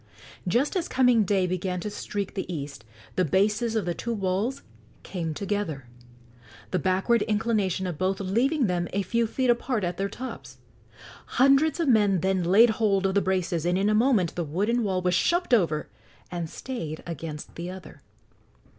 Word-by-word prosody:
Just 245 Hz, -, +1 dB
as 355 Hz, -3 st, 0 dB
coming 250 Hz, -4 st, +4 dB
day 190 Hz, -1 st, +2 dB
began 180 Hz, 0 st, -2 dB
to 210 Hz, -, -4 dB
streak 205 Hz, -1 st, -4 dB
the 190 Hz, -, -4 dB
east 145 Hz, -3 st, -6 dB, 0.3 s
the 185 Hz, -, +2 dB
bases 210 Hz, -, +1 dB
of 215 Hz, -5 st, 0 dB
the 175 Hz, -, -1 dB
two 235 Hz, +6 st, -3 dB
walls 200 Hz, +7 st, -1 dB, 0.4 s
came 170 Hz, -4 st, -4 dB
together, 200 Hz, -10 st, -3 dB, 0.9 s
the 185 Hz, -, +1 dB
backward 190 Hz, +7 st, +2 dB
inclination 210 Hz, -3 st, 0 dB
of 175 Hz, -5 st, -4 dB
both 190 Hz, +1 st, 0 dB
leaving 240 Hz, +9 st, +1 dB
them 175 Hz, -3 st, 0 dB
a 200 Hz, +1 st, 0 dB
few 230 Hz, +5 st, 0 dB
feet 255 Hz, +2 st, +2 dB
apart 240 Hz, -2 st, -1 dB
at 175 Hz, 0 st, -2 dB
their 195 Hz, +1 st, -1 dB
tops. 135 Hz, -, -8 dB, 0.8 s
Hundreds 275 Hz, +5 st, +4 dB
of 335 Hz, -, +1 dB
men 205 Hz, -7 st, +4 dB
then 190 Hz, 0 st, +1 dB
laid 210 Hz, +7 st, +6 dB
hold 205 Hz, -3 st, +1 dB
of 190 Hz, -, +1 dB
the 200 Hz, -, +3 dB
braces, 180 Hz, -4 st, 0 dB
and 175 Hz, +1 st, +1 dB
in 200 Hz, +2 st, +2 dB
a -, -, +3 dB
moment 215 Hz, -, +3 dB
the 175 Hz, -, -2 dB
wooden 205 Hz, +10 st, 0 dB
wall 190 Hz, -3 st, -1 dB
was 180 Hz, 0 st, +2 dB
shoved 345 Hz, -, +1 dB
over 165 Hz, -9 st, +2 dB, 0.4 s
and 170 Hz, -2 st, -4 dB
stayed 165 Hz, -13 st, -6 dB
against 160 Hz, -2 st, -6 dB
the 170 Hz, +1 st, -6 dB
other. 185 Hz, 0 st, -10 dB
195 Hz, 175 wpm, -26 LUFS, 180-230 Hz, 0.9 s, laid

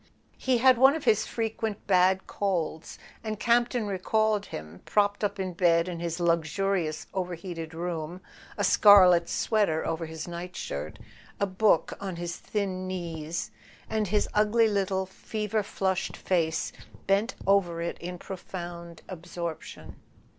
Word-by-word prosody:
He 260 Hz, -2 st, +2 dB
had 255 Hz, 0 st, +5 dB
one 270 Hz, +3 st, +7 dB
of 320 Hz, -, -4 dB
his 220 Hz, -4 st, +3 dB
frequent 225 Hz, -2 st, -3 dB
bad 190 Hz, 0 st, +3 dB
colds, 170 Hz, -5 st, -2 dB, 0.3 s
and 215 Hz, -2 st, -4 dB
Campton 240 Hz, 0 st, +2 dB
recalled 210 Hz, +2 st, 0 dB
him, 80 Hz, +2 st, -8 dB
propped 205 Hz, 0 st, +1 dB
up 205 Hz, -, -1 dB
in 185 Hz, -1 st, -2 dB
bed 170 Hz, -1 st, +3 dB
in 175 Hz, -2 st, -4 dB
his 170 Hz, -1 st, -3 dB
lux¬ 170 Hz, -1 st, +2 dB, 0.2 s
urious 190 Hz, -6 st, 0 dB
overheated 175 Hz, -3 st, -5 dB
room, 170 Hz, 0 st, -4 dB, 0.4 s
a -, -, 0 dB
scarlet 180 Hz, -5 st, +7 dB
sweater 200 Hz, -8 st, +1 dB
over 165 Hz, 0 st, -2 dB
his 160 Hz, +1 st, -7 dB
nightshirt, 170 Hz, -, -5 dB, 0.4 s
a 200 Hz, -, +2 dB
book 195 Hz, -2 st, +2 dB
on 195 Hz, -3 st, -4 dB
his 170 Hz, 0 st, -4 dB
thin 190 Hz, -3 st, -3 dB
knees, 170 Hz, -3 st, -4 dB, 0.4 s
and 215 Hz, -1 st, -1 dB
his 210 Hz, +2 st, +1 dB
ugly 215 Hz, +2 st, +4 dB
little 195 Hz, -2 st, 0 dB
fever 210 Hz, +3 st, -3 dB
flushed 190 Hz, -2 st, -2 dB
face 165 Hz, -3 st, 0 dB, 0.3 s
bent 200 Hz, +5 st, +1 dB
over 190 Hz, -4 st, +2 dB
it 170 Hz, 0 st, -3 dB
in 180 Hz, +1 st, -6 dB
profound 175 Hz, -2 st, -8 dB
absorption. 170 Hz, -2 st, -7 dB
185 Hz, 140 wpm, -28 LUFS, 170-210 Hz, 0.4 s, one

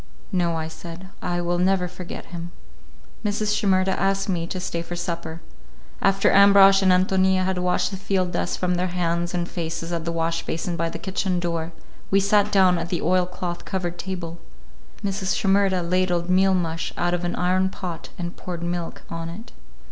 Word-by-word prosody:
"No," 175 Hz, -3 st, +1 dB
I 160 Hz, -1 st, -2 dB
said, 170 Hz, +3 st, -9 dB
"I 175 Hz, 0 st, -1 dB
will 175 Hz, 0 st, 0 dB
never 185 Hz, 0 st, +2 dB
forget 180 Hz, 0 st, -8 dB
him." 170 Hz, 0 st, -5 dB, 0.7 s
Mrs. 210 Hz, 0 st, 0 dB
Shimerda 190 Hz, -2 st, +2 dB
asked 195 Hz, 0 st, +1 dB
me 170 Hz, -3 st, -1 dB
to 185 Hz, -, -4 dB
stay 170 Hz, -2 st, -3 dB
for 170 Hz, +1 st, -6 dB
supper. 170 Hz, -2 st, -4 dB, 0.6 s
After 195 Hz, 0 st, +3 dB
Ambrosch 200 Hz, 0 st, +7 dB
and 190 Hz, -1 st, +4 dB
Ántonia 185 Hz, 0 st, +3 dB
had 190 Hz, -1 st, 0 dB
washed 180 Hz, +1 st, +1 dB
the 190 Hz, -, -4 dB
field 185 Hz, -2 st, 0 dB
dust 175 Hz, -, -1 dB
from 180 Hz, -1 st, 0 dB
their 180 Hz, +1 st, 0 dB
hands 175 Hz, 0 st, -1 dB
and 175 Hz, -1 st, -1 dB
faces 165 Hz, -1 st, -4 dB
at 170 Hz, -1 st, -2 dB
the 170 Hz, -, -2 dB
wash 165 Hz, 0 st, -1 dB
basin 170 Hz, +2 st, -3 dB
by 165 Hz, 0 st, -1 dB
the -, -, -6 dB
kitchen 190 Hz, -1 st, -1 dB
door, 170 Hz, -1 st, -2 dB, 0.4 s
we 195 Hz, -, +4 dB
sat 205 Hz, +1 st, +3 dB
down 185 Hz, -3 st, +5 dB
at 170 Hz, +1 st, -4 dB
the 175 Hz, -, -2 dB
oilcloth 180 Hz, 0 st, 0 dB
covered 175 Hz, -2 st, -3 dB
table. 175 Hz, -3 st, -5 dB, 0.7 s
Mrs. 195 Hz, -1 st, -1 dB
Shimerda 195 Hz, -4 st, +2 dB
ladled 180 Hz, -1 st, +1 dB
meal 190 Hz, +1 st, +4 dB
mush 165 Hz, -2 st, -2 dB
out 175 Hz, 0 st, +1 dB
of 175 Hz, 0 st, -1 dB
an 175 Hz, -, -1 dB
iron 185 Hz, +1 st, +2 dB
pot 180 Hz, -3 st, -6 dB
and 175 Hz, 0 st, -5 dB
poured 175 Hz, -2 st, -6 dB
milk 175 Hz, -1 st, -4 dB
on 165 Hz, 0 st, -4 dB
it. 215 Hz, +8 st, -9 dB
180 Hz, 185 wpm, -24 LUFS, 170-190 Hz, 0.7 s, Ambrosch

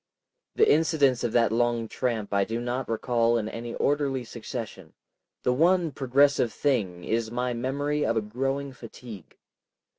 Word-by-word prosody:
The 440 Hz, -, +4 dB
incidents 145 Hz, -6 st, +3 dB
of 120 Hz, -, 0 dB
that 115 Hz, -3 st, +3 dB
long 120 Hz, 0 st, +1 dB
tramp 110 Hz, -4 st, -2 dB
I 100 Hz, 0 st, +3 dB
do 115 Hz, +4 st, -3 dB
not 125 Hz, +2 st, -3 dB
recall 115 Hz, 0 st, +1 dB
in 110 Hz, -2 st, -2 dB
any 115 Hz, +1 st, -6 dB
orderly 140 Hz, -3 st, 0 dB
succession, 110 Hz, -7 st, -7 dB, 0.5 s
the 125 Hz, -, +2 dB
one 170 Hz, +3 st, +3 dB
progressive 135 Hz, -2 st, +2 dB
thing 100 Hz, -11 st, -1 dB
is 115 Hz, 0 st, -1 dB
my 125 Hz, +1 st, -2 dB
memory 145 Hz, +5 st, -1 dB
of 115 Hz, +1 st, +1 dB
a -, -, +2 dB
growing 135 Hz, +5 st, -3 dB
fatigue. 115 Hz, -5 st, -11 dB
120 Hz, 150 wpm, -26 LUFS, 115-135 Hz, 0.5 s, The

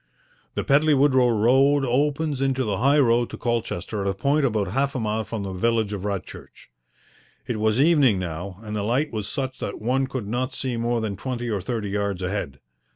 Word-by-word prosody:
The -, -, -1 dB
Pedley 150 Hz, +1 st, +4 dB
Woodrow 130 Hz, -3 st, +4 dB
Road 135 Hz, +5 st, +3 dB
opens 145 Hz, +2 st, 0 dB
into 135 Hz, -1 st, +1 dB
the 100 Hz, -4 st, -2 dB
high 140 Hz, +4 st, +4 dB
road 120 Hz, -3 st, +3 dB
to -, -, -7 dB
Colchester 115 Hz, -4 st, -2 dB
at 100 Hz, -, 0 dB
a 95 Hz, -, -2 dB
point 140 Hz, +8 st, +1 dB
about 105 Hz, -5 st, -1 dB
half 135 Hz, +6 st, 0 dB
a -, -, -1 dB
mile 110 Hz, 0 st, -1 dB
from 110 Hz, -1 st, -5 dB
the 95 Hz, -1 st, -5 dB
village 110 Hz, +2 st, 0 dB
of 100 Hz, -, -4 dB
Radchurch. 100 Hz, -3 st, -7 dB, 0.7 s
It 115 Hz, -3 st, -3 dB
was 110 Hz, +2 st, +2 dB
evening 145 Hz, -, +4 dB
now 90 Hz, +1 st, -5 dB
and 105 Hz, -1 st, -5 dB
the 105 Hz, -, -1 dB
light 125 Hz, +9 st, 0 dB
was 105 Hz, -2 st, -3 dB
such 130 Hz, -1 st, -3 dB
that -, -, -5 dB
one 130 Hz, +4 st, 0 dB
could 130 Hz, -5 st, -5 dB
not 125 Hz, +4 st, -2 dB
see 130 Hz, -2 st, -2 dB
more 115 Hz, 0 st, 0 dB
than 105 Hz, -3 st, -3 dB
twenty 120 Hz, -3 st, -4 dB
or 100 Hz, -3 st, -1 dB
thirty 105 Hz, 0 st, -3 dB
yards 100 Hz, -2 st, -2 dB
ahead. 90 Hz, -8 st, -3 dB
115 Hz, 205 wpm, -24 LUFS, 105-135 Hz, 0.7 s, Pedley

